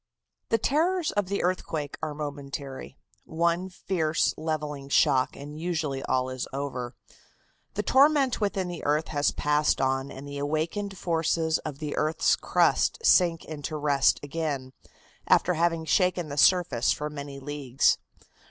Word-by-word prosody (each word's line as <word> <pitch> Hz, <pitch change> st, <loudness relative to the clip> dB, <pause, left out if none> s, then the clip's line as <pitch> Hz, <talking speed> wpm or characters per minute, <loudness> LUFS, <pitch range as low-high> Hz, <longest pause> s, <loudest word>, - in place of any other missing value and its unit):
The 225 Hz, -, +3 dB
terrors 325 Hz, -, +1 dB
of 205 Hz, -2 st, -1 dB
the 200 Hz, +1 st, -1 dB
earthquake 160 Hz, -5 st, -2 dB
are 155 Hz, -2 st, -3 dB
momentary. 140 Hz, -2 st, -6 dB, 0.3 s
One 170 Hz, +3 st, 0 dB
fierce, 170 Hz, -4 st, 0 dB
levelling 150 Hz, -3 st, -4 dB
shock 130 Hz, -2 st, +3 dB
and 145 Hz, +2 st, -9 dB
usually 160 Hz, -5 st, -2 dB
all 130 Hz, 0 st, 0 dB
is 130 Hz, -1 st, -4 dB
over. 130 Hz, -3 st, -4 dB, 0.8 s
The -, -, -1 dB
torment 275 Hz, -3 st, +4 dB
within 195 Hz, -3 st, 0 dB
the 175 Hz, -1 st, -6 dB
earth 150 Hz, +2 st, 0 dB
has 145 Hz, -1 st, +1 dB
passed 150 Hz, 0 st, +1 dB
on 135 Hz, +1 st, 0 dB
and 140 Hz, +1 st, -9 dB
the 140 Hz, 0 st, -6 dB
awakened 165 Hz, +7 st, -2 dB
forces 165 Hz, -1 st, 0 dB
of 150 Hz, -3 st, -6 dB
the 150 Hz, 0 st, -4 dB
earth's 155 Hz, +1 st, +2 dB
crust -, -, +2 dB
sink 170 Hz, -3 st, +4 dB
into 155 Hz, 0 st, -5 dB
rest 145 Hz, -2 st, +3 dB
again, 145 Hz, -3 st, -3 dB, 0.5 s
after 180 Hz, -, +4 dB
having 165 Hz, -1 st, 0 dB
shaken 180 Hz, -1 st, +1 dB
the 140 Hz, -, -5 dB
surface 155 Hz, -8 st, +4 dB
for 150 Hz, -, -2 dB
many 140 Hz, -1 st, -7 dB
leagues. 135 Hz, -2 st, +1 dB
155 Hz, 145 wpm, -27 LUFS, 140-175 Hz, 0.8 s, torment